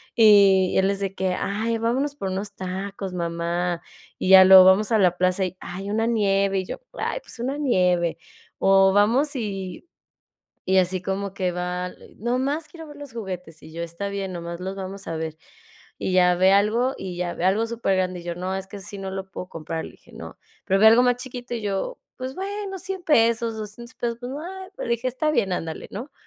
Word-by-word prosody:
y 200 -4 +6
él 190 +1 +3
es 200 - -3
de 195 -1 -2
que: 185 -1 0
"Ay, 225 +3 -1
vámonos 265 +5 0
por 195 -8 -4
unos 200 +2 -4
tacos, 190 +1 -5
mamá", 170 0 -2 0.4
y 185 - -1
ya 190 0 +10
luego 190 -1 +10
vamos 200 +4 +5
a 225 - +4
la 180 -3 +4
plaza 185 +1 +2
y 185 - -5
ay, 195 +3 -6
una 225 +2 +1
nieve, 195 -3 +2
y 185 - -4
yo - - -7
ay, - - -2
pues - - -13
una 265 +4 -2
nieve, 180 - +2 0.4
o 195 0 +5
vamos 250 +9 +3
y 195 - -5 0.8
y 190 0 +4
así 185 0 +1
como 195 +1 -3
que 185 -2 -1
va 180 +1 -3 0.3
nomás, 265 +7 -1
quiero 325 -2 -11
ver 295 - -11
los 285 -4 -10
juguetes, 180 -7 -6
y 160 - -12
yo 170 +1 -5
está 170 +4 -5
bien 195 -1 -4
nomás 170 0 -6
los 190 +1 -5
vamos 195 0 -7
a 165 - -3
ver, 160 -1 -4 0.6
y 185 - -2
ya 180 -1 +5
ve 185 +2 +5
algo 225 +6 +2
y 185 -2 -6
ya 175 -1 -2
ve - - -4
algo 200 +5 +2
supergrande, 185 -6 -1
y - - -14
yo 175 0 -3
no, 185 +2 -3
es 190 - -5
que 205 - -8
si 205 +1 -8
no 190 0 -5
lo 190 0 -5
puedo 180 0 -7
comprar 160 0 -5
y - - -11
dije: - - -21
"No". - - -10 0.3
Pero 195 0 +3
ve 220 - +7
algo 230 +2 +6
más 245 -1 +3
chiquito 245 -1 -6
y 225 - -4
yo, 205 - -2 0.2
pues 260 +1 -5
bueno, 395 0 -4
$100 380 +1 -5
pesos, 230 -6 +2
$200 220 +3 -8
pesos, 235 -1 -3
pues 245 - -6
va, 370 +6 -7
le - - -4
dije: 235 +2 0
"Está 305 +5 0
bien, 200 -9 +1
ándale, 165 -2 -4
¿no?". 250 +8 -7
195 Hz, 210 wpm, -24 LUFS, 185-235 Hz, 0.8 s, ya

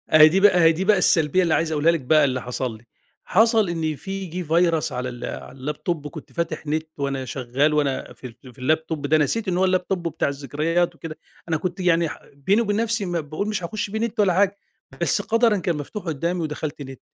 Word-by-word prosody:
أهي 155 0 +9
دي 185 +5 +1
بقى 200 -2 +6
أهي 165 - +7
دي 175 +4 -2
بقى 205 -1 +4
السلبية 170 0 +3
اللي 165 -3 +2
عايز 160 -1 0
أقولها 155 +2 +3
لِك 165 - -1
بقى 150 +3 +4
اللي 130 -2 -1
حصل 125 -1 -4
لي، 110 - -20 0.4
حصل 220 0 +3
إن 160 -3 -2
في 195 +4 -5
جِه 180 +1 -5
virus 165 -1 +2
على 125 +1 -3
ال 120 -1 -8
على - - -6
اللاب 145 +3 -5
توب 160 -4 -2
كنت 155 -1 -11
فاتح 170 -2 -3
نت 155 +1 -2
وأنا 135 -2 -2
شغال 130 +4 0
وأنا 140 -3 -1
في - - -11
ال 125 +1 -13
في - - -25
اللاب 155 +5 +1
توب 150 -3 -3
ده 155 +2 +3
نسيت 200 +8 0
إن 175 - 0
هو 190 - +3
اللابتوب 185 -1 0
بتاع 160 -2 -1
الذكريات 150 +5 -1
وكده، 155 -1 -8 0.3
أنا 160 - +1
كنت 180 +3 -4
يعني 170 -2 +2
ح - - -8
بيني 190 +11 +1
وبين 205 -3 0
نفسي 225 -1 0
ما 175 -1 -1
باقول 155 +7 -4
مش 210 -4 -2
هاخُش 205 +3 -3
بيه 220 - -2
نت، 230 -1 -1
ولا 190 -4 +3
حاجة 200 +1 +2 0.4
بس - - +1
قَدَرًا 230 -1 +3
كان 175 -3 -1
مفتوح 150 +8 -6
قُدّامي، 170 +2 -2
ودخلت 150 -2 -4
نت 135 -2 -10
165 Hz, 230 wpm, -23 LUFS, 145-185 Hz, 0.4 s, أهي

